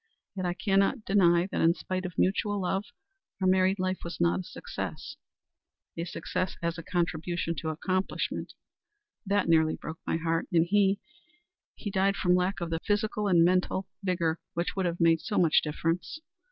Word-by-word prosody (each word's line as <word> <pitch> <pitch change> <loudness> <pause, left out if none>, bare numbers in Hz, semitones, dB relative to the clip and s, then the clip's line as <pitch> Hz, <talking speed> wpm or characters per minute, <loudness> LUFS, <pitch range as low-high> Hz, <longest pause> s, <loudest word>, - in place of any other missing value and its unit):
Yet 185 -2 -2
I 175 - -1
cannot 195 +4 +1
deny 175 -3 +4
that - - -1
in 165 +1 +4
spite 185 0 -3
of 175 - -11
mutual 205 +2 +1
love 190 +2 -1 0.5
our 190 - 0
married 185 +1 +3
life 185 0 -1
was 170 - -6
not 85 +1 +2
a - - -4
success - - -6 0.8
a 170 - -3
success 180 +1 -3
as 170 0 -2
a - - -7
contribution 170 0 -1
to 160 +3 -3
accomplishment. 185 +4 -2 0.7
That 200 -1 +2
nearly 160 -1 +4
broke 160 - -8
my - - +1
heart, 165 0 -1
and 165 -2 +4
he 195 +1 +3 0.8
he 205 - -5
died 195 +1 +2
from 180 -2 +2
lack 180 +2 +1
of 170 -1 -3
the 165 - 0
physical 210 0 0
and 170 -3 +5
mental 185 +1 +1 0.2
vigor 175 -4 0 0.2
which 170 +1 -1
would 190 -2 0
have 170 0 -3
made 165 -1 +4
so 210 - -3
much 165 -3 +5
difference. 165 - -2
180 Hz, 175 wpm, -29 LUFS, 165-195 Hz, 0.8 s, and